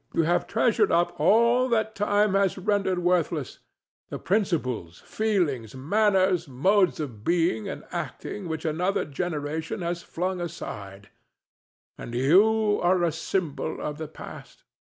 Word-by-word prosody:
You 165 Hz, -, +3 dB
have 175 Hz, +2 st, +1 dB
treasured 430 Hz, -, +2 dB
up 175 Hz, +1 st, +1 dB
all 235 Hz, +4 st, +4 dB
that 220 Hz, -2 st, +1 dB
time 205 Hz, 0 st, +2 dB
has 195 Hz, -1 st, +2 dB
rendered 195 Hz, -1 st, 0 dB
worthless—the 175 Hz, -5 st, -3 dB
principles, 140 Hz, -, -1 dB
feelings, 165 Hz, -, -1 dB
manners, 190 Hz, +4 st, +2 dB
modes 185 Hz, +9 st, +2 dB
of 120 Hz, -9 st, -6 dB
being 165 Hz, -8 st, +1 dB
and -, -, -6 dB
acting 200 Hz, -4 st, -5 dB
which 160 Hz, -1 st, -4 dB
another 175 Hz, +5 st, 0 dB
generation 155 Hz, +2 st, -4 dB
has 170 Hz, 0 st, -2 dB
flung 180 Hz, +1 st, -3 dB
aside—and 100 Hz, -, -10 dB
you 205 Hz, -, +4 dB
are 180 Hz, 0 st, +3 dB
a 170 Hz, -, +2 dB
symbol 160 Hz, -1 st, -3 dB
of 150 Hz, 0 st, -5 dB
the 160 Hz, -, -4 dB
past. 155 Hz, -, -11 dB
175 Hz, 125 wpm, -26 LUFS, 150-200 Hz, -, all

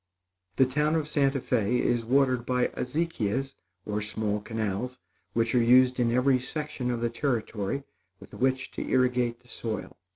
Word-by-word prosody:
The 130 Hz, -, +5 dB
town 150 Hz, +4 st, +1 dB
of 155 Hz, -2 st, 0 dB
Santa 140 Hz, -2 st, +2 dB
Fé 125 Hz, -1 st, +1 dB
is 120 Hz, -1 st, +1 dB
watered 130 Hz, 0 st, +2 dB
by 125 Hz, 0 st, +1 dB
azequias 135 Hz, -3 st, -2 dB, 0.3 s
or 105 Hz, 0 st, -2 dB
small 105 Hz, 0 st, -2 dB
canals, 110 Hz, +3 st, -3 dB, 0.4 s
which 115 Hz, 0 st, +1 dB
are 125 Hz, -, +4 dB
used 125 Hz, +2 st, +5 dB
in 120 Hz, -1 st, +2 dB
every 130 Hz, +2 st, +3 dB
section 145 Hz, -1 st, -4 dB
of 120 Hz, -1 st, -1 dB
the 120 Hz, -, +1 dB
Territory, 115 Hz, -1 st, -2 dB, 0.4 s
with -, -, -15 dB
which 130 Hz, +1 st, 0 dB
to -, -, -5 dB
irrigate 125 Hz, -2 st, +1 dB
the 125 Hz, -, -24 dB
soil. 115 Hz, -2 st, -5 dB
125 Hz, 160 wpm, -28 LUFS, 115-135 Hz, 0.4 s, The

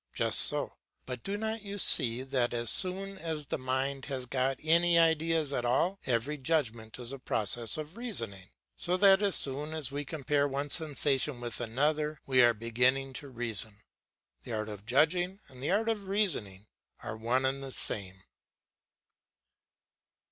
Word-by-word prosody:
Just -, -, +8 dB
so; -, -, +3 dB, 0.3 s
but 125 Hz, -2 st, -6 dB
do 200 Hz, +1 st, -3 dB
not 220 Hz, +1 st, -4 dB
you 200 Hz, 0 st, -7 dB
see 125 Hz, -, +6 dB
that 125 Hz, -2 st, -1 dB
as 120 Hz, -1 st, 0 dB
soon 195 Hz, +1 st, +1 dB
as 160 Hz, -3 st, -4 dB
the -, -, -4 dB
mind 130 Hz, +1 st, -3 dB
has 130 Hz, -3 st, -4 dB
got 130 Hz, +1 st, -1 dB
any 170 Hz, +2 st, +4 dB
ideas 160 Hz, -2 st, +2 dB
at 120 Hz, -, -2 dB
all, 170 Hz, +11 st, 0 dB
every 130 Hz, +5 st, -1 dB
judgment 120 Hz, -7 st, -2 dB
is 125 Hz, 0 st, -6 dB
a 135 Hz, -, -8 dB
process 115 Hz, -, 0 dB
of 155 Hz, +6 st, -8 dB
reasoning? 115 Hz, -, -3 dB, 0.3 s
So 180 Hz, +1 st, +1 dB
that 195 Hz, 0 st, +5 dB
as 200 Hz, -2 st, +1 dB
soon 145 Hz, +3 st, -1 dB
as 145 Hz, -4 st, -3 dB
we 145 Hz, +1 st, -4 dB
compare 145 Hz, -1 st, -1 dB
one 140 Hz, +1 st, -4 dB
sensation 145 Hz, -4 st, 0 dB
with 120 Hz, -2 st, -6 dB
another, 150 Hz, +6 st, -1 dB
we 130 Hz, -2 st, +3 dB
are 120 Hz, -1 st, +4 dB
beginning 125 Hz, +4 st, 0 dB
to 145 Hz, -, -11 dB
reason. 115 Hz, -4 st, -2 dB, 0.7 s
The -, -, -7 dB
art 110 Hz, 0 st, -3 dB
of 105 Hz, 0 st, -9 dB
judging 175 Hz, +9 st, +1 dB
and 130 Hz, -1 st, -13 dB
the 140 Hz, -, -3 dB
art 215 Hz, +4 st, +1 dB
of 210 Hz, -4 st, -2 dB
reasoning 140 Hz, -, -1 dB, 0.4 s
are -, -, -6 dB
one 120 Hz, +4 st, -1 dB
and 135 Hz, +1 st, -1 dB
the 135 Hz, -1 st, -7 dB
same. 95 Hz, -5 st, -2 dB
135 Hz, 165 wpm, -30 LUFS, 120-165 Hz, 0.7 s, Just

